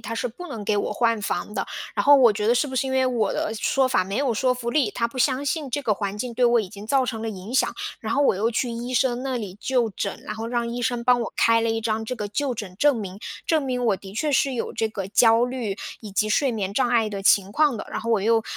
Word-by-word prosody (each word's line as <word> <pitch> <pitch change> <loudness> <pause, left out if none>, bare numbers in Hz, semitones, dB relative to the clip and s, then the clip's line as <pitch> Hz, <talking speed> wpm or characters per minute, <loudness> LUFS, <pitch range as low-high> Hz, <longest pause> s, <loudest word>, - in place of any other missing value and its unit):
他 225 - -6
是 250 - -2
不 350 +10 -8
能 220 -7 -6
给 210 0 +1
我 - - -1
换 230 -2 +1
房 210 - -3
的。 - - -2 0.3
然 - - +1
后 285 0 +8
我 240 -5 +6
觉 210 +1 -2
得 240 - +5
是 290 - +2
不 260 - -7
是 265 +1 0
因 - - -2
为 260 0 +2
我 230 -5 0
的 215 - -2
说 265 +4 +1
法 255 -6 +2
没 195 +3 -4
有 265 -4 +1
说 255 +3 +2
服 240 -1 -4
力， 270 -7 +2
他 235 +2 -1
不 255 +2 -9
相 265 +2 +1
信 295 -4 -2
这 290 - -1
个 215 -5 +1
环 200 0 -4
境 240 0 -4
对 250 +1 +2
我 235 -1 +4
已 195 - -5
经 200 +1 -10
造 265 +1 +2
成 225 -3 -4
了 225 - -2
影 200 +5 -8
响， - - +2 0.3
然 - - -3
后 285 0 +2
我 275 - +4
又 220 +5 0
去 240 +1 -1
医 240 +2 -5
生 250 0 +1
那 265 -2 -2
里 200 -4 -6
就 250 -3 +1
诊。 200 0 -3
然 210 - -5
后 225 +1 -5
让 235 -1 -1
医 240 +1 -4
生 240 0 -1
帮 245 -1 +4
我 230 - -4
开 230 0 +4
了 230 - 0
一 225 0 -1
张 220 0 -1
这 250 - -3
个 210 -2 -3
就 265 +4 -1
诊 190 -4 -6
证 290 -2 +4
明， 195 -2 -6 0.3
证 315 -3 +2
明 250 -2 -2
我 205 -4 +2
的 195 0 -11
确 295 +6 -1
是 270 -1 +2
有 235 - -3
这 225 - -1
个 195 -3 -5
焦 225 +3 +4
虑 245 -6 -3 0.2
以 215 -3 -9
及 205 +2 0
睡 270 +5 +2
眠 200 -4 -3
障 255 0 +2
碍 230 -3 +2
的 200 -2 -5
情 200 0 +4
况 295 -4 +3
的。 - - -7
然 - - -3
后 230 +1 -3
我 220 -3 +3
又， 225 +2 +3
235 Hz, 315 characters per minute, -24 LUFS, 215-255 Hz, 0.3 s, 后